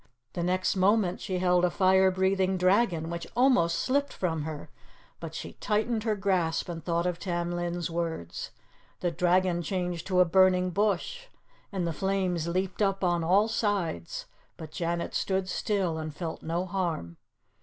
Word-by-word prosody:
The 175 - -3
next 185 +2 +1
moment 190 -1 +2
she 185 -3 -2
held 180 -1 +3
a 180 - +4
fire 190 +1 +4
breathing 190 0 +1
dragon, 185 -3 +2
which 170 -1 -5
almost 245 -11 +4
slipped 285 +2 0
from 160 -5 -2
her, 155 -2 -7 0.5
but - - -7
she - - -6
tightened 220 +1 -1
her 220 -2 +1
grasp, 185 -5 0
and 165 -2 -5
thought 170 0 0
of 180 -1 -1
Tam 175 -2 -2
Lin's 175 0 -2
words. 165 - -4 0.5
The 175 - 0
dragon 180 0 +2
changed 175 0 -3
to 185 -1 +2
a 180 - +7
burning 185 +1 +4
bush, 210 - -1 0.4
and 190 -4 -2
the 165 - -1
flames 185 -2 -1
leaped 185 +3 -2
up 195 -1 +1
on 175 -2 +2
all 195 +6 +4
sides, 200 - -2 0.3
but 155 -2 -9
Janet 170 +1 -2
stood 190 -1 0
still 185 -4 -1
and 155 -1 -5
felt 165 -1 -5
no 170 +3 -2
harm. 170 - -3
180 Hz, 165 wpm, -28 LUFS, 170-195 Hz, 0.5 s, a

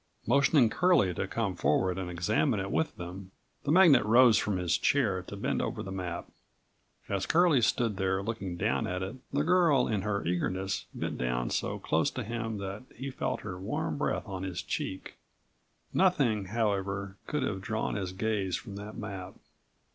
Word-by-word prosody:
Motioning 135 +1 +4
Curlie 175 - +3
to - - -2
come 110 -5 -2
forward 90 +4 +1
and 90 -2 -4
examine 105 - +1
it 100 0 -3
with 160 - 0
them, 90 +2 -7 0.4
the 145 - +1
magnate 170 - +7
rose 115 +2 +6
from 105 -3 +1
his 90 -1 +1
chair 110 -10 +2
to 95 - -9
bend 100 - -1
over 110 -4 -3
the 95 - -6
map. 90 -2 -4 0.8
As 100 -1 -2
Curlie 165 -6 +4
stood 115 -2 +1
there 95 0 0
looking 100 -5 -4
down - - 0
at 90 +1 -2
it, 95 +7 -5
the 145 +1 +1
girl 165 -6 +4
in 105 -3 0
her 100 0 -2
eagerness 95 +2 -1
bent - - -4
down - - -1
so - - -1
close 80 +1 +1
to 130 - -5
him 115 0 -3
that 100 +1 -5
he 135 +1 -5
felt 130 0 -2
her 90 -3 -6
warm 95 - -2
breath - - -1
on 95 -2 -5
his 95 -1 -4
cheek. 95 - -4 0.8
Nothing, 135 - +3
however, 100 -2 -1
could 150 -3 -1
have 95 -7 -2
drawn 110 +2 -2
his 95 -3 -3
gaze 100 -1 -1
from 100 -5 -7
that 105 +1 -8
map. 95 -3 -6
100 Hz, 175 wpm, -30 LUFS, 95-120 Hz, 0.8 s, magnate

